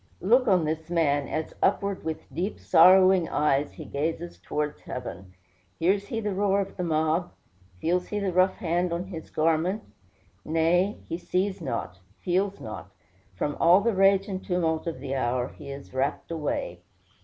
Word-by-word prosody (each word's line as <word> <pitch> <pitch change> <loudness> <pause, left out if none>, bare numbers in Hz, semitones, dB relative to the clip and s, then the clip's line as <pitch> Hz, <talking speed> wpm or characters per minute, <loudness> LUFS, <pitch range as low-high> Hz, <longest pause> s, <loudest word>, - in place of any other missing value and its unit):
Look 245 +6 +3
on 185 -5 +4
this 160 +1 -3
man, 145 -5 +1
as 155 0 -3
upward, 200 -1 +1
with 160 -3 -6
deep, 180 +8 -2
sorrowing 185 -1 +6
eyes, 145 -1 +1
he - - -9
gazes 165 +4 -3
towards 150 0 -3
heaven. 95 -7 -7 0.4
Hears 195 +4 +1
he 225 - -3
the 210 -2 -2
roar 200 0 +2
of 195 - -3
the 180 - -3
mob? 160 +1 0 0.5
Feels 180 - 0
he 210 - -3
the 195 -3 -1
rough 185 +1 +3
hand 175 +1 -1
on 170 +1 -2
his 175 -4 -8
garment? 165 +6 +1 0.6
Nay, 170 +5 +2
he 165 - -4
sees 190 +1 -1
not, 105 - -4 0.2
feels 190 +2 0
not: 100 -4 -8 0.5
from 145 +10 -2
all 175 +4 +6
the 230 +2 +1
rage 195 0 +4
and 190 -2 -4
tumult 165 -3 -1
of 165 - -3
the 135 - -4
hour 125 -1 0
he 145 -2 -11
is 140 -1 -9
rapt 135 +5 -2
away. 165 - -3
170 Hz, 165 wpm, -26 LUFS, 155-190 Hz, 0.6 s, sorrowing